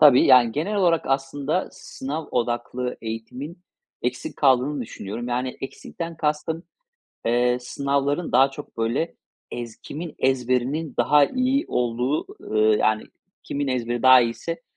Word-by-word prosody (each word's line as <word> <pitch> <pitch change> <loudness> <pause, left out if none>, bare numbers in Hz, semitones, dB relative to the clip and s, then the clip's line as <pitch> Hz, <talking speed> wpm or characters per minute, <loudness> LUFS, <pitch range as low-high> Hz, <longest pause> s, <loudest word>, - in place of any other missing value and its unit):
Tabii, 140 -4 +8
yani, 120 -3 +6
genel 175 - -1
olarak 175 -5 +3
aslında 140 +5 -1
sınav 150 +4 -6
odaklı 120 +1 -2
eğitimin, 125 +9 -6 0.4
eksik 125 0 -3
kaldığını 135 +1 +3
düşünüyorum. 115 +1 -6
Yani, 125 +1 -2
eksikten 165 +4 -6
kastım: 155 +2 -1 0.6
Eee, 125 +1 +2
sınavların 140 +5 -1
daha 135 +1 +5
çok, 145 +2 -10
böyle, 115 +9 0 0.4
ez 120 -2 -6
kimin 160 +1 -7
ezberinin 130 +3 0
daha 145 +4 +5
iyi 260 - +1
olduğu, 125 +4 0 0.3
eee, 110 0 +5
yani, 110 0 +2 0.4
kimin 140 -1 -3
ezberi 120 -1 -1
daha 130 0 +9
iyiyse 120 - -3
130 Hz, 125 wpm, -24 LUFS, 120-150 Hz, 0.6 s, daha